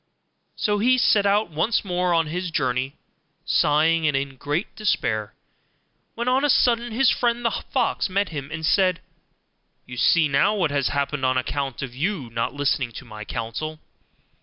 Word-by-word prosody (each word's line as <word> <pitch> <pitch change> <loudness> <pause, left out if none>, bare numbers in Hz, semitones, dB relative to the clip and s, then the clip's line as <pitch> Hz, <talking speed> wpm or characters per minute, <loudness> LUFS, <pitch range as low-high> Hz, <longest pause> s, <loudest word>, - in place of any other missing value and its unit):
So 205 -1 0
he 255 +4 +4
set 210 -4 +3
out 200 -2 +2
once 185 +9 0
more 180 -1 0
on 165 -1 +3
his 175 +3 -3
journey, 130 -3 -1 0.5
sighing, 155 +2 +3
and 145 -2 +1
in 135 0 -3
great 145 +5 -3
despair, 110 - -1 0.8
when 235 +1 -3
on 260 +2 +2
a 295 - +2
sudden 240 -2 +3
his 250 +3 +3
friend 240 0 0
the 230 - +3
fox - - -1
met 200 +2 0
him, 140 -4 -6
and 160 0 -4
said, 185 0 +3 0.9
'You 125 - -9
see 165 +5 +4
now 145 +10 +2
what 175 -7 0
has 140 -3 +1
happened 140 +1 -2
on 130 0 +2
account 135 0 -3
of 125 -3 -6
your 150 - -2
not 115 0 -1
listening 140 -3 0
to - - -9
my 110 -2 -9
counsel. 135 +10 -4
155 Hz, 170 wpm, -23 LUFS, 135-205 Hz, 0.9 s, he